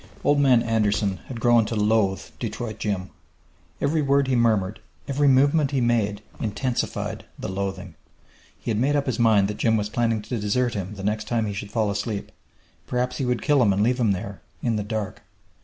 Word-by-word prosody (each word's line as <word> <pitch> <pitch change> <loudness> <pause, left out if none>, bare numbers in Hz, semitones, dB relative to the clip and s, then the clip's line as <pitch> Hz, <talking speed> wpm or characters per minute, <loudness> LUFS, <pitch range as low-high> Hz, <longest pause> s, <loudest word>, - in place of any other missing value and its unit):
Old 145 0 +3
Man 130 -4 +5
Anderson 105 -3 +1
had 125 -3 -6
grown 120 0 +5
to 115 - -3
loathe 105 -2 +2 0.2
Detroit 110 -3 -4
Jim. 95 -3 -2 0.7
Every 155 +2 +1
word 140 -1 +2
he 130 - +1
murmured, 110 -4 +2 0.3
every 140 +1 +2
movement 140 +2 +4
he 140 -2 0
made, 110 -4 +1 0.2
intensified 120 +3 -2
the - - -5
loathing. 95 -1 -4 0.7
He - - -3
had 105 - 0
made 140 +4 +2
up 140 -1 +1
his 125 -4 -2
mind 110 -4 +4
that 105 0 -4
Jim 115 -1 +2
was 105 -1 -2
planning 115 -2 0
to 115 +2 -3
desert 115 +4 0
him 100 0 -4
the 95 - -8
next 105 +1 -1
time 115 -2 0
he 105 - -3
should 100 +1 -6
fall 110 -2 0
asleep; 100 +1 -3 0.6
perhaps 125 +2 -1
would 125 -3 0
kill 145 -3 +4
him 105 -4 +4
and 100 +2 +2
leave 125 +3 +1
him 115 -4 +3
there 100 +1 -4 0.2
in 115 -2 +1
the 105 - -1
dark. 105 -2 -4
110 Hz, 195 wpm, -24 LUFS, 105-125 Hz, 0.7 s, Man